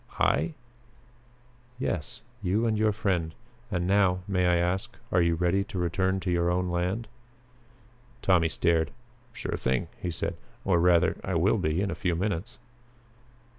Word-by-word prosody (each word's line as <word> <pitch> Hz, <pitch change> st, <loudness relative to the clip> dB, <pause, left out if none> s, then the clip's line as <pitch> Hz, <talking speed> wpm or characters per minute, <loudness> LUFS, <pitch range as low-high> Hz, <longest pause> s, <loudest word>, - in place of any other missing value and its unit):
"I?" 165 Hz, -, +2 dB, 1.2 s
"Yes. 110 Hz, -, -3 dB, 0.2 s
You 105 Hz, +4 st, +1 dB
and 110 Hz, -1 st, +2 dB
your 110 Hz, 0 st, +3 dB
friend. 95 Hz, -6 st, -1 dB, 0.3 s
And 90 Hz, -4 st, -1 dB
now, 95 Hz, -1 st, +3 dB
may 90 Hz, -2 st, +2 dB
I 90 Hz, -, +4 dB
ask, 90 Hz, +2 st, -1 dB
are 90 Hz, -, +4 dB
you 85 Hz, -1 st, +3 dB
ready 90 Hz, +3 st, +2 dB
to 100 Hz, -, -7 dB
return 95 Hz, +2 st, +1 dB
to 90 Hz, -, -1 dB
your 85 Hz, 0 st, +2 dB
own 90 Hz, +1 st, 0 dB
land?" 90 Hz, +6 st, -1 dB, 1.2 s
Tommy 85 Hz, -4 st, +4 dB
stared. 80 Hz, 0 st, +2 dB, 0.4 s
"Sure 125 Hz, -, -4 dB
thing," 65 Hz, -1 st, 0 dB
he 90 Hz, -, -2 dB
said, 85 Hz, -, -3 dB, 0.3 s
"or 90 Hz, -3 st, +3 dB
rather, 85 Hz, -1 st, +4 dB
I -, -, -2 dB
will -, -, +3 dB
be 80 Hz, +4 st, 0 dB
in 100 Hz, -2 st, -1 dB
a -, -, -7 dB
few 90 Hz, -2 st, +1 dB
minutes." 100 Hz, +4 st, -2 dB
90 Hz, 155 wpm, -28 LUFS, 85-100 Hz, 1.2 s, I